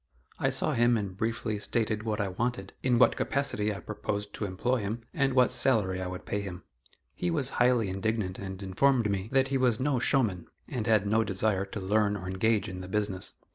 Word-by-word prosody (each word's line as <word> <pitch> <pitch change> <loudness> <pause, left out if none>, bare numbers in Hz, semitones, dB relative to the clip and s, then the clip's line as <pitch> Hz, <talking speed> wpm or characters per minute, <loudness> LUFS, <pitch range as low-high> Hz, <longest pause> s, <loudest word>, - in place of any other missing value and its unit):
I - - +2
saw - - 0
him 120 0 +4
and 100 -3 -4
briefly 110 0 -2
stated 110 0 -1
what 110 -1 -2
I 100 -2 0
wanted, 120 +7 -3
in 125 -2 +2
what 125 - +5
capacity 120 -7 0
I 100 - -5
proposed 105 -1 -4
to 105 - -3
employ 105 +7 0
him, 110 +1 -3
and 140 -6 +1
what 125 -1 +5
salary 95 -8 +2
I 90 - -3
would 90 0 -7
pay 105 - -2
him. 90 -3 -7 0.5
He 90 - -2
was 125 +11 +1
highly 120 -3 +4
indignant 95 0 -2
and 95 0 -6
informed 115 +3 +2
me 100 +1 -2
that 135 0 +3
he 135 -1 +1
was 125 -4 +2
"no 135 -1 +1
showman," 115 - +1 0.2
and 115 -3 -3
had 110 -3 +4
no 110 +2 +3
desire 100 -1 0
to 105 - -6
learn 105 +1 +1
or 90 -2 -7
engage 105 +3 +1
in 90 -2 -6
the 90 - -7
business. 100 -2 -2
105 Hz, 210 wpm, -29 LUFS, 95-120 Hz, 0.5 s, what